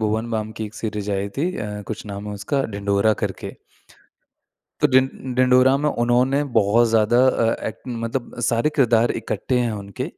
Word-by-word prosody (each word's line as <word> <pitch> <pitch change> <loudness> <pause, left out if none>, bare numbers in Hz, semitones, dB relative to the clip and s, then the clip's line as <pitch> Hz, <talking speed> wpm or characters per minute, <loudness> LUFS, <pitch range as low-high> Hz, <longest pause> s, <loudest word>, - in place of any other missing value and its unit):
भुवन 110 +2 -1
balm 110 -1 -2
की 110 0 -5
एक 105 0 -9
series 105 -2 -4
आई 100 +1 -1
थी 175 +6 -1
अ, 105 -1 -5
कुछ 110 -1 -6
नाम 100 0 -6
है 105 - -5
उसका 120 +8 -1
ढिंढोरा 100 +1 +1
करके। - - -4 1.3
तो - - +5
ढिं 130 0 +1
ढिंढोरा 130 +1 +5
में 150 +1 0
उन्होंने 125 +3 +1
बहुत 110 +2 +4
ज़्यादा 110 +1 +3
अ 115 -3 +2
ए - - -2 0.3
मतलब 115 +2 -4
सारे 120 +5 +1
किरदार 120 -4 +3
इकट्ठे 130 - -2
हैं 120 -2 0
उनके, 100 -2 -6
115 Hz, 170 wpm, -22 LUFS, 105-125 Hz, 1.3 s, तो